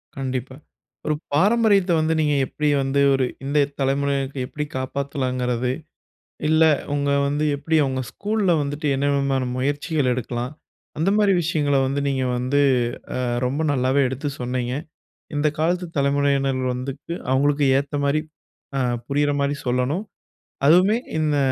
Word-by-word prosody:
கண்டிப்பா. 130 -1 -4 0.5
ஒரு 155 - +2 0.2
பாரம்பரியத்த 200 +2 +3
வந்து 155 +1 +1
நீங்க 150 -1 +2
எப்படி 150 +2 -1
வந்து 135 +1 +1
ஒரு 135 -1 +2 0.2
இந்த 145 +1 +2
தலமுறையினருக்கு 135 -1 0
எப்படி 150 - -4
காப்பாத்தலாங்கிறது, 130 -2 -2 0.8
இல்லை 160 +1 +5 0.2
உங்க 145 0 0 0.2
வந்து 145 +2 0
எப்படி 150 +3 -1
அவுங்க 130 -1 -1
ஸ்கூல்ல 210 -2 0
வந்துட்டு, 145 +2 -3
என்ன 140 +1 0
விதமான 135 -2 0
முயற்சிகள் 145 +1 0
எடுக்கலாம். 120 +1 -4 0.5
அந்த 165 +5 +2
மாரி 205 -2 +4
விஷயங்கள 150 -3 +1
வந்து, 135 +2 -1
நீங்க 135 -1 0
வந்து 130 +3 0 0.6
அ - - -1 0.2
ரொம்ப 140 +5 -1
நல்லாவே 130 +1 +2
எடுத்து 130 +3 -3
சொன்னீங்க. 125 0 -2 0.6
இந்த 145 +1 +2
காலத்து 175 +3 0
தலைமுறையினர்கள் 140 -2 +1
வந்துட்டு, 135 +6 -6 0.2
அவுங்களுக்கு 145 +2 +2
ஏத்த 140 +1 -5
மாரி 145 +2 +2 0.6
அ - - +1 0.3
புரியுற 145 +1 +1
மாரி 140 +1 0
சொல்லணும். 125 - 0 0.6
அதுவுமே 185 +7 +5 0.2
இந்த 150 -2 +1
140 Hz, 130 wpm, -22 LUFS, 130-150 Hz, 0.8 s, இல்லை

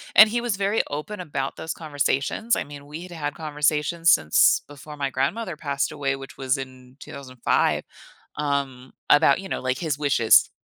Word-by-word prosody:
and 215 +1 +9
he 240 +2 0
was 240 -4 -1
very 200 +2 +1
open 150 +8 -5
about 140 -6 -4
those 160 - -4
conversations. 150 - -1
I - - -2
mean, 145 0 -11
we'd 165 +5 -9
had 150 -3 -4
conversations 150 +2 +2
since 75 - +4
before 145 +1 -11
my 140 -1 -1
grandmother 155 - -2
passed 140 -1 -2
away, 140 -2 -2
which 135 0 -11
was 130 0 0
in 130 -1 -10
2005, 130 -3 -1 0.5
um, 140 -3 -3 0.2
about, 145 +1 +5
you 195 -1 -8
know, - - -3
like, 130 0 -1
his 155 -4 -2
wishes 130 -6 +4
145 Hz, 170 wpm, -24 LUFS, 135-165 Hz, 0.5 s, and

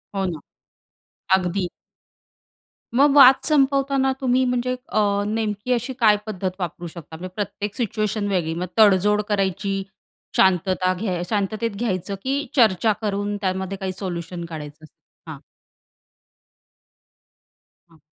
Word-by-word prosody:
हो 195 -1 0
ना. 165 -4 -3 1.0
अगदी. 180 0 -2 1.3
मग 280 +2 +5
वाद 265 -2 +9
संपवताना 275 -2 +2
तुम्ही 255 0 +2
म्हणजे 250 0 0
अ, 205 -1 +1
नेमकी 215 +1 -2
अशी 240 +2 -2
काय 210 -3 +5
पद्धत 190 -3 -3
वापरू 175 0 -4
शकता, 160 -1 -10
म्हणजे 185 +1 -8
प्रत्येक 205 0 -4
सिच्युएशन 215 -3 -1
वेगळी 175 -5 0
मग 175 +2 -3
तडजोड 210 0 +5
करायची, 195 0 -1 0.5
शांतता 185 0 +3
घ्याय 185 -2 -3
शांततेत 215 +2 -1
घ्यायचं 195 -3 -2
की 280 +2 -1
चर्चा 220 -4 +4
करून 205 0 -2
त्यामध्ये 190 0 -2
काही 190 -1 -3
सोल्युशन 175 -2 -5
काढायचं? 155 -1 -9 0.4
हां. - - -8 2.5
हां. 160 -2 -23
200 Hz, 115 wpm, -22 LUFS, 185-225 Hz, 2.5 s, वाद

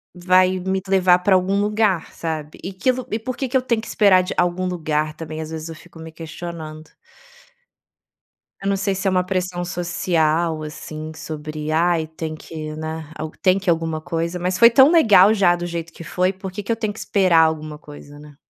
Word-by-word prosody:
vai 185 +1 +3
me 190 +1 -1
levar 185 -2 +4
pra 190 +2 +2
algum 190 +2 +1
lugar, 210 -4 0
sabe. 155 -2 -5
E 190 - -4
que 190 +7 +1
lu 255 0 -6
e 220 - 0
por 240 +2 -5
que 265 -3 -3
que 260 - +2
eu - - 0
tenho 235 -3 0
que - - -10
esperar 195 -4 +4
de 180 - -4
algum 180 +1 +1
lugar 155 -3 -1
também, 160 0 -6
às 155 - -6
vezes 160 0 -6
eu 165 - -7
fico 165 +1 -16
me 160 0 -9
questionando. 160 -1 -8 1.7
Eu 195 - -1
não 195 - +1
sei 195 0 -1
se 195 +1 -2
é - - +4
uma 180 -1 +2
pressão 180 -1 -2
social, 170 -2 0
assim, 155 +1 -7
sobre: 155 0 -6
"Ai, 165 0 +2
tem 160 0 -6
que, 155 -1 -7
né, 160 0 -6
ao 155 0 -5
tem 185 0 +3
que 190 -2 -2
alguma 165 -1 0
coisa". 165 +2 -3
Mas 180 +1 -1
foi 235 0 +8
tão 265 +6 +6
legal 215 - +6
já 185 -4 +3
do 175 - -5
jeito 170 -1 -5
que 165 - -11
foi, 185 +3 0
por 190 0 -8
que 205 +2 -6
que 230 - -3
eu - - +2
tenho 215 -2 -3
que - - -11
esperar 185 -5 +3
alguma 155 -1 -3
coisa, 145 -1 -13
né. 150 -1 -14
175 Hz, 215 wpm, -21 LUFS, 160-190 Hz, 1.7 s, foi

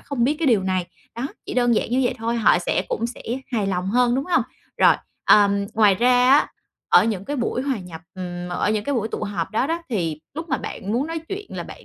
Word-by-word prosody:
không 250 -5 -1
biết 290 - +2
cái 330 - 0
điều 225 -7 +4
này. 185 -2 -1 0.3
Đó, 240 - -2 0.2
chỉ - - -5
đơn 245 -2 +3
giản - - -1
như 255 +2 +2
vậy - - 0
thôi, 230 +1 -1
họ 215 -5 +4
sẽ 175 - 0
cũng 230 - -1
sẽ 240 - -9 0.3
hài 215 -4 0
lòng 180 -1 -1
hơn, 245 +1 +3
đúng 270 +2 -1
hông? 355 - +2 0.3
Rồi, - - +6 0.3
ờm, 200 -1 +4
ngoài 210 -3 +5
ra 250 +3 +4
á, 285 - +5 0.4
ở - - +6
những 205 -4 -2
cái 290 +4 -3
buổi 250 +1 -1
hòa 270 -4 -1
nhập 175 -4 -9
ừm, 180 -1 -6
ở 175 +3 0
những 210 -1 -1
cái 285 - -1
buổi 220 -3 -1
tụ - - -5
họp 185 -5 -3
đó 225 +5 0
đó 335 +2 -2
thì 165 - -2
lúc 320 +2 -6
mà - - +1
bạn 200 +3 -5
muốn 260 +6 0
nói 330 0 -3
chuyện 405 +1 -5
là - - -3
bạn - - -12
230 Hz, 255 wpm, -22 LUFS, 195-260 Hz, 0.4 s, Rồi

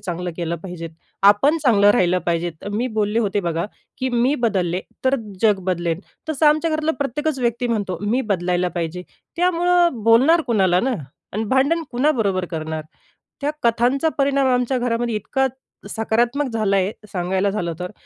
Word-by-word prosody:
चांगलं 180 -2 -4
केलं 170 -1 -2
पाहिजे. 175 -3 -6 0.3
आपण 210 +11 +5
चांगलं 205 -6 +5
राहिलं 185 -5 +3
पाहिजे. 170 0 0 0.2
मी 235 +4 0
बोलले 210 +1 +1
होते 205 -2 0
बघा, 170 -1 -2 0.3
की 260 0 -1
"मी 245 +4 +2
बदलले 185 -5 0 0.2
तर 265 +1 +3 0.3
जग 210 -3 +4
बदलेल." 175 -2 -1 0.3
तसं 310 0 +2
आमच्या 310 +2 +3
घरातला 310 0 0
प्रत्येकच 285 +2 -2
व्यक्ती 245 0 0
म्हणतो, 205 -6 -2
"मी 230 +6 +1
बदलायला 180 -1 0
पाहिजे." 170 +1 -3 0.3
त्यामुळं 350 -6 +2
बोलणार 265 +9 +5
कुणाला 190 -6 +3
ना? 260 +1 0 0.4
आणि 215 +3 -2
भांडण 295 +6 +2
कुणाबरोबर 230 -9 +1
करणार? 160 -1 -4 0.6
त्या 285 - 0
कथांचा 245 +6 +2
परिणाम 275 -1 +2
आमच्या 250 +1 0
घरामध्ये 235 -1 -1
इतका 265 +6 0 0.4
सकारात्मक 240 +5 0
झाला 210 -3 +1
आहे, 195 +2 +1 0.2
सांगायला 190 +2 0
झालं 175 -5 -2
तर. 180 - -4
225 Hz, 155 wpm, -21 LUFS, 185-265 Hz, 0.6 s, आपण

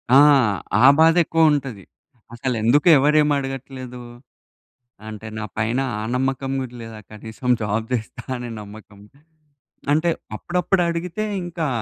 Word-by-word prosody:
ఆ! - - +9 0.7
ఆ - - +8
బాధే 165 +2 +6
ఎక్కువుంటది. 145 - +1 0.5
అసలెందుకు 125 +4 +1
ఎవరేమి 150 +1 +3
అడగట్లేదు? 135 -2 -6 1.1
అంటే 110 0 -8
నా 110 - -4
పైన 115 +4 0 0.2
ఆ 105 - -4
నమ్మకం 135 +1 -1
గూడా 125 -2 -7
లేదా 115 -1 -9
కనీసం 110 +3 -7
జాబ్ 110 +2 -2
జేస్తా 120 0 -4
అనే 120 0 -6
నమ్మకం. 105 0 -13 0.9
అంటే 160 +3 +2 0.3
అప్పుడప్పుడు 180 - 0
అడిగితే 175 +5 -3 0.2
ఇంకా, 170 -2 -3
130 Hz, 115 wpm, -21 LUFS, 110-150 Hz, 1.1 s, ఆ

